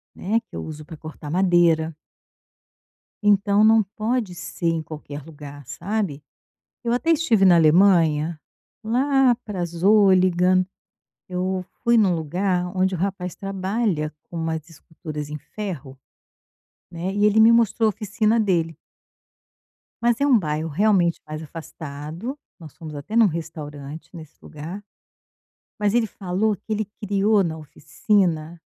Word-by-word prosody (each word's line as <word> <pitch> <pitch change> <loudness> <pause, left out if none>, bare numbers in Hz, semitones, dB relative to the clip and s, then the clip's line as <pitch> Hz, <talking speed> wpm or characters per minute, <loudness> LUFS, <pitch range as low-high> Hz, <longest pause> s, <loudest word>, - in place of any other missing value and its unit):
né, 220 +5 0
que - - -10
eu - - -4
uso 155 -1 -8
pra 160 +1 -10
cortar 155 -1 -9
madeira 170 -2 +3 1.3
então, 205 +1 +4
não 220 0 +6
pode 215 0 -2
ser 170 0 -5
em 165 -1 +1
qualquer 150 -2 -8
lugar, 145 -3 -11
sabe. 165 - -3 0.6
Eu 235 - -1
até 325 +7 +1
estive 240 -11 +3
na 180 -2 +7
Alemanha, 165 -2 +4 0.4
lá 260 +2 +3
para 190 -5 -3
Zolligan, 185 0 +4 0.6
eu 185 +1 -2 0.2
fui 235 - +3
em 225 - +6
um 185 -3 +2
lugar 180 +3 -1
onde 185 0 +1
o - - -4
rapaz 185 -1 -3
trabalha 195 -4 -2
com 170 - -9
umas 160 -1 -3
esculturas 155 -2 -8
em 150 - -5
ferro, 150 -6 -7 0.9
né, 175 +3 -4
e 205 +1 +2
ele 210 +1 +5
me 225 - +7
mostrou 230 -1 +3
oficina 215 +2 0
dele 170 -6 0 1.3
mas 235 +1 +2
é 285 - +3
um 260 -5 +5
bairro 155 -2 -2
realmente 180 0 +2
mais 155 +1 -6
afastado, 160 - -7 0.2
nós 155 -4 -12
fomos 155 -2 -9
até 145 +9 -7
em 230 - +6
um - - +6
restaurante 155 -3 -6
nesse 155 -3 -11
lugar, 165 +7 -8 1.0
mas 210 -1 +1
ele 235 -2 +2
falou 200 +2 -1
que 210 - -12
ele 215 -1 -1 0.2
criou 205 +1 +2
na 160 -2 -3
oficina 165 - -1
180 Hz, 140 wpm, -23 LUFS, 160-210 Hz, 1.3 s, na